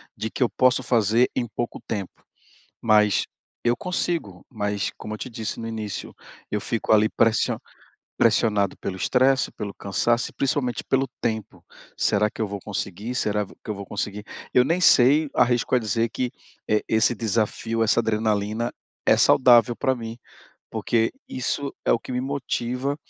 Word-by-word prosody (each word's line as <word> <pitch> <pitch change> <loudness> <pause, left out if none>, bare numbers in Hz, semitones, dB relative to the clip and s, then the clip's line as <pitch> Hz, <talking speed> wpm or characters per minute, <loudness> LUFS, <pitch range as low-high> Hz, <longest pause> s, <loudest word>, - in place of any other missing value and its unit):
de 110 - -4
que - - -7
eu 120 - +2
posso 130 0 +3
fazer 115 0 +3
em 120 - -1
pouco 120 +1 -4
tempo, 100 -4 -5 0.6
mas 105 -2 +4 0.4
eu 120 0 +2
consigo. 170 - -3
Mas, 105 -3 -2
como 110 - -6
eu 110 - -7
te 130 - -6
disse 110 -1 -5
no 115 - -5
início, 110 -3 -5 0.4
eu 105 - -1
fico 115 +1 -1
ali 110 0 +5
pressio 115 -1 +2 0.6
pressionado 110 -3 +2
pelo 95 - -4
estresse, 130 +6 +2
pelo 100 -2 -6
cansaço 120 +4 0
e - - -21
principalmente 130 -3 -1
pelo 135 0 +1
tempo. 110 -3 -3 0.3
"Será 105 +1 +2
que - - -11
eu 110 - +1
vou 100 0 -6
conseguir? 105 +3 -4
Será 105 -3 0
v - - -15
que - - -14
eu 105 - -1
vou 100 0 -7
conseguir?" 105 +1 -4 0.3
Eu 125 - +6
nem 170 +5 +1
sei 145 -1 +5
arrisco 120 +1 +2
a 125 - +4
dizer 115 +1 0
que, 125 +1 -2 0.4
eh, 105 0 +3
esse 110 +2 +3
desafio, 115 0 -1
essa 110 0 +3
adrenalina 110 +1 0 0.3
é - - +5
saudável 120 -1 +5
pra 130 +1 0
mim, 115 -1 -6 0.5
porque 115 -1 0 0.2
isso 135 +2 -2
é - - +2
o - - +3
que 125 - -8
me 125 - -1
motiva 135 0 -2
115 Hz, 170 wpm, -24 LUFS, 105-125 Hz, 0.6 s, Eu